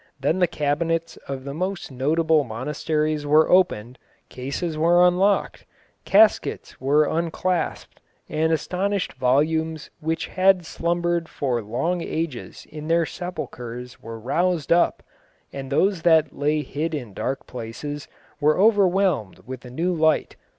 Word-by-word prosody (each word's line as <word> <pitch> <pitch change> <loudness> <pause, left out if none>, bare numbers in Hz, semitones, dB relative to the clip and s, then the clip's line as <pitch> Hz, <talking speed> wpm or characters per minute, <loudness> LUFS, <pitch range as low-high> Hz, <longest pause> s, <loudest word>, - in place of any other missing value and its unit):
Then 150 +7 +1
the 180 - +4
cabinets 165 +2 -1
of 135 -1 -5
the 140 0 -6
most 185 +1 -3
notable 155 +4 +2
monasteries 150 +5 -2
were 155 +2 +4
opened, 130 - +2 0.3
cases 145 +6 -4
were 170 +3 +5
unlocked, 190 +3 +1 0.4
caskets - - +3
were 145 +3 +3
unclasped, 170 +2 -2 0.3
and 160 +1 0
astonished 185 +5 -1
volumes 155 +5 0
which 160 0 -2
had 185 -2 +3
slumbered 170 0 -1
for 125 -5 -1
long 135 - -2
ages 160 -7 -4
in 150 0 -7
their 165 0 +3
sepulchres 125 -9 -7
were 115 0 -8
roused 165 +6 0
up, 170 +1 +3 0.5
and 135 -1 -6
those 185 +4 +2
that 160 -3 +3
lay 150 +1 0
hid 155 +4 -3
in 120 -8 -6
dark 135 +7 -3
places 125 +5 -6 0.3
were 150 +1 +3
overwhelmed 190 - +2
with 130 -1 -8
a - - -8
new 170 +8 -1
light.... 160 -1 +1
155 Hz, 130 wpm, -23 LUFS, 135-175 Hz, 0.5 s, were